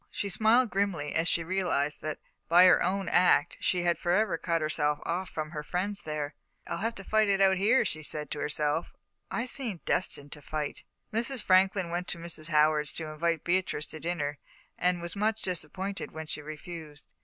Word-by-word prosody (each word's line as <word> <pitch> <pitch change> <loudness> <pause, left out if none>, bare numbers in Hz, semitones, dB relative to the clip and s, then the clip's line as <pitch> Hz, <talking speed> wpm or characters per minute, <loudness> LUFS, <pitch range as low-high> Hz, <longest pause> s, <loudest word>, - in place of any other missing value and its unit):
She 200 - -3
smiled 225 +5 +4
grimly 190 -7 -1
as 165 +1 +1
she 170 - +2
realised 165 -5 0
that, 155 -1 -3 0.3
by 175 +2 +8
her 185 - +6
own 195 +2 0
act, 175 -5 +4
she 180 -1 +1
had 175 -1 +1
forever 190 +5 +2
cut 170 -1 0
herself 150 -1 0
off 180 +3 -2
from 155 -1 -4
her 150 -3 -4
friends 190 +6 -2
there. 150 -1 -4 0.3
"I'll - - -3
have 225 +2 -1
to 195 - -8
fight 215 +1 +2
it 195 -1 +3
out 190 -1 +5
here," 220 +7 +4
she 155 - -3
said 150 -1 -5
to 150 - -3
herself; 150 +2 -1 0.4
"I 235 - -1
seem 240 -7 -2
destined 145 -5 -1
to 150 - -9
fight." 150 0 -4 0.3
Mrs. 235 +2 0
Franklin 190 -1 +3
went 175 +1 -2
to - - -3
Mrs. 165 -2 -6
Howard's 150 -1 +3
to 155 -2 -5
invite 165 +1 -1
Beatrice 175 -4 0
to 155 - -8
dinner, 150 -4 -2 0.4
and 180 0 +1
was 170 - -5
much 220 +2 0
disappointed 185 +2 -3
when 160 0 -7
she 150 - -5
refused. 155 0 -9
175 Hz, 190 wpm, -29 LUFS, 155-195 Hz, 0.4 s, by